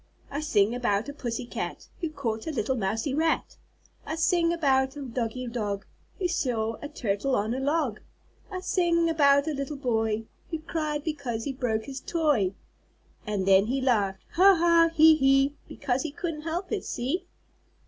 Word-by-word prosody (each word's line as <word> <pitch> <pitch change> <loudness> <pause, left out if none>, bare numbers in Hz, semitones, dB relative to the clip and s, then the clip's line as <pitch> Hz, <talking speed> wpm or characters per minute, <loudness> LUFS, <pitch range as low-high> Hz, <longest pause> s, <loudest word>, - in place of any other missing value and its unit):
I 285 - -2
sing 220 -8 +2
about 235 -2 0
a - - -6
pussy 240 -4 -4
cat, - - -5
Who 330 - -2
caught 235 -7 -4
a - - -1
little 270 -3 -1
mousie 225 +5 -1
rat. 320 +2 0 0.5
I 315 - -4
sing 335 +1 +2
about 270 -5 +2
a 290 - -6
doggie 250 0 -3
dog, 210 -5 -3 0.3
Who 370 - 0
saw 230 -10 -1
a 290 - -6
turtle 245 -1 -1
on 215 +2 0
a 260 - -2
log. 280 -5 0 0.5
I 370 -3 -5
sing 340 -3 +2
about 280 -2 +4
a 315 - 0
little 280 +1 -4
boy, 225 -4 0 0.3
Who 325 - -2
cried 310 -2 -3
because 280 -8 -3
he 275 - -3
broke 230 -4 -1
his 270 -1 -6
toy. 280 - +1 0.7
And 205 -3 -1
then 195 +1 +5
he 265 +3 0
laughed, 205 -7 +1
'Ha! 385 +2 +6
Ha! 335 -1 +5
He! 315 0 +7
He!' 270 0 +3
Because 250 0 -2
he 320 - -3
couldn't 305 +1 -4
help 335 +4 -4
it; 425 -3 -1
see?" 340 +10 -3
275 Hz, 175 wpm, -27 LUFS, 230-320 Hz, 0.7 s, He